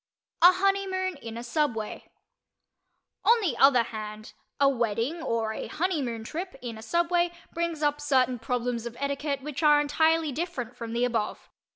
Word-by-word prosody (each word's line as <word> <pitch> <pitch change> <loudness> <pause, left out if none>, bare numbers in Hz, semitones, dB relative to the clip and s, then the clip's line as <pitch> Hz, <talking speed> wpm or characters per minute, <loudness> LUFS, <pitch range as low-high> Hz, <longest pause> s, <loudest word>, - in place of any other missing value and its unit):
A 355 +2 +9
HONEYMOON 375 -2 0
IN 230 -4 -8
A 235 - -6
SUBWAY 240 -4 -2 1.1
On 470 +1 +5
the 335 - 0
other 270 -3 +6
hand, 215 -1 -7 0.3
a 280 - +5
wedding 240 +5 0
or 225 -6 -1
a - - -5
"honeymoon" 290 -10 -2
trip 345 +9 -5
in 240 -3 -6
a 220 - -10
subway 345 +7 +1 0.2
brings 335 -2 -2
up 295 0 +1
certain 260 -4 +2
problems 240 0 -2
of 235 0 -9
etiquette 280 0 -2
which 295 -1 -5
are 295 -1 +6
entirely 315 +1 +2
different 265 -5 -4
from 230 -1 -6
the 240 +1 +2
above. 230 -4 -3
280 Hz, 160 wpm, -27 LUFS, 235-330 Hz, 1.1 s, A